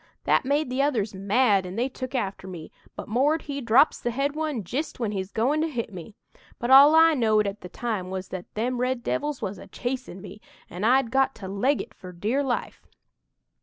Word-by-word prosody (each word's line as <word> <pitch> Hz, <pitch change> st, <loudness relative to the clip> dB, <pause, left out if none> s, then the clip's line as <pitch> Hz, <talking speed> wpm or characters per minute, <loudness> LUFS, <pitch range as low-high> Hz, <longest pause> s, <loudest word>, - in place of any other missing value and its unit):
That -, -, +2 dB
made 285 Hz, 0 st, 0 dB
the 260 Hz, +2 st, +1 dB
others 235 Hz, -8 st, 0 dB
mad 200 Hz, +1 st, +2 dB
an' 180 Hz, +1 st, -7 dB
they 240 Hz, +4 st, 0 dB
took 260 Hz, 0 st, -7 dB
after 195 Hz, -5 st, -3 dB
me, 170 Hz, -4 st, -9 dB, 0.2 s
but -, -, -7 dB
'Mord' 280 Hz, +8 st, +1 dB
he 280 Hz, -1 st, -5 dB
drops 235 Hz, +5 st, +4 dB
the 240 Hz, -, -2 dB
head 275 Hz, +4 st, -1 dB
one 305 Hz, -8 st, -2 dB
jist 265 Hz, -, -4 dB
when 225 Hz, -4 st, -1 dB
he's 190 Hz, -1 st, -4 dB
goin' 275 Hz, +8 st, +1 dB
to 325 Hz, -, +1 dB
hit 230 Hz, -7 st, -4 dB
me. 185 Hz, +4 st, -9 dB, 0.4 s
But 240 Hz, +2 st, -2 dB
all 280 Hz, +4 st, +9 dB
I 325 Hz, 0 st, +7 dB
knowed 220 Hz, -6 st, +2 dB
at 200 Hz, +1 st, -4 dB
the 180 Hz, -, -9 dB
time 215 Hz, -6 st, -3 dB
was 185 Hz, 0 st, -5 dB
that 185 Hz, -2 st, -7 dB
them 245 Hz, +3 st, -1 dB
red 255 Hz, -1 st, -1 dB
devils 295 Hz, +1 st, -2 dB
was 190 Hz, -1 st, -4 dB
a -, -, -11 dB
chasin' 250 Hz, -7 st, -5 dB
me, 205 Hz, +2 st, -11 dB, 0.3 s
and 185 Hz, +5 st, -1 dB
I'd 255 Hz, -1 st, +3 dB
got 270 Hz, 0 st, +2 dB
to 195 Hz, -, -8 dB
'leg 245 Hz, +9 st, 0 dB
it' -, -, -17 dB
for 185 Hz, -, -11 dB
dear 215 Hz, +10 st, -1 dB
life! 260 Hz, -4 st, -3 dB
240 Hz, 215 wpm, -25 LUFS, 200-270 Hz, 0.4 s, all